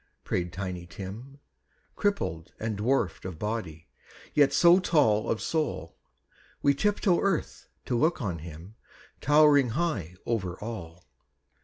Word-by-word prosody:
" - - -49
prayed 90 -1 -2
Tiny 90 -2 -5
Tim, 105 +10 -8 0.6
Crippled, 85 - -1
and 110 -1 -2
dwarfed 110 0 0
of 90 -3 -6
body, 90 -6 -4 0.5
yet 145 -2 +5
so 175 +1 +6
tall 140 - +2
Of 110 - -1
soul, 155 - -2 0.7
we 140 - +5
tiptoe 200 +3 +2
earth 195 -5 -1 0.2
to 125 - -1
look 160 +8 +2
on 95 - -3
him, 85 +5 -10
High - - -23 0.2
towering 145 - +3
over 95 -6 -2
all. 90 -6 -7
110 Hz, 130 wpm, -28 LUFS, 90-145 Hz, 0.7 s, so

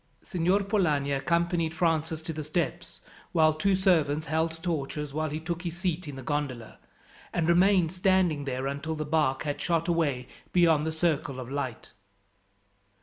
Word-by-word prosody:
Signor 185 +2 +1
Polani 165 -9 +1
accompanied 170 +3 0
Francis 160 -1 0
to 160 0 -4
the 155 0 -4
steps, 165 +3 -3 0.3
while 155 -2 +5
two 190 +5 +2
servants 160 -5 +2
held 160 +2 -1
torches 150 -3 -3
while 155 +1 -1
he 150 +2 -3
took 170 +1 -4
his 175 -1 -4
seat 180 -2 -2
in 145 - -6
the 135 - -8
gondola, 135 -5 -3 0.5
and 165 -2 0
remained 180 -1 +4
standing 185 -5 +2
there 130 -1 -3
until 140 +3 -3
the 155 0 -3
barque 150 -3 +1
had 145 -1 -3
shot 165 -1 0
away 145 -8 0 0.2
beyond 165 -4 +4
the - - 0
circle 155 -4 -1
of 130 0 -7
light. 135 -5 -4
160 Hz, 160 wpm, -28 LUFS, 145-175 Hz, 0.5 s, while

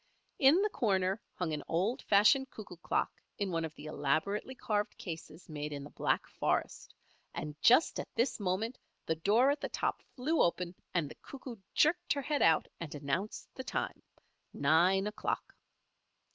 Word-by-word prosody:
In 305 +8 +6
the 425 - +2
corner 195 - +1
hung 170 -4 -2
an 150 - -2
old 190 +9 0
fashioned 210 +7 +5
cuckoo 195 -5 -10
clock 170 - 0 0.3
in 200 -2 -1
one 165 -1 0
of 160 -1 -5
the 150 - -10
elaborately 155 - -1
carved 210 -5 -1
cases 165 -1 -8
made 150 -1 -5
in 140 -1 -5
the 145 - -10
Black - - 0
Forest, - - -2 0.4
and 150 -1 -4
just 250 +8 +5
at - - -5
this 235 +2 +1
moment 205 +5 -1 0.3
the 160 - +1
door 215 - +4
at 290 - -2
the - - -2
top - - -1
flew 300 +5 +1
open 175 0 +1 0.2
and 170 -4 0
the - - -9
Cuckoo 255 -3 -9 0.2
jerked 350 +3 +3
her 280 -1 -3
head 295 +1 0
out 160 -1 +4
and 160 -3 -6
announced 145 +9 -3
the 260 - -6
time - - -3 0.5
nine 175 +7 +4
o'clock. 210 0 -3
195 Hz, 170 wpm, -33 LUFS, 160-250 Hz, 0.5 s, In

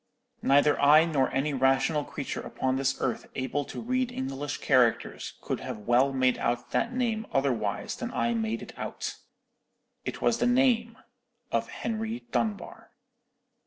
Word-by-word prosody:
"Neither 145 +2 +4
I 150 +3 +7
nor 140 -6 +1
any 140 +3 0
rational 135 +3 +2
creature 140 0 -5
upon 130 0 -2
this 135 0 +1
earth 125 - -2
able 135 +2 -1
to - - -7
read 255 +1 -1
English 135 - -4
characters 125 -4 +1
could - - -3
have - - -5
well 120 +6 +3
made 130 -1 +2
out 120 +1 -1
that 235 - +1
name 230 -3 -1
otherwise 120 -7 0
than 245 -1 -5
I 235 -1 0
made 225 -1 -2
it - - -10
out. - - -4 0.9
"It - - -5
was 235 - +2
the - - +2
name 245 -2 +2 0.5
of - - 0
Henry 225 +1 -3
Dunbar. 220 +1 -2
145 Hz, 150 wpm, -28 LUFS, -, 0.9 s, I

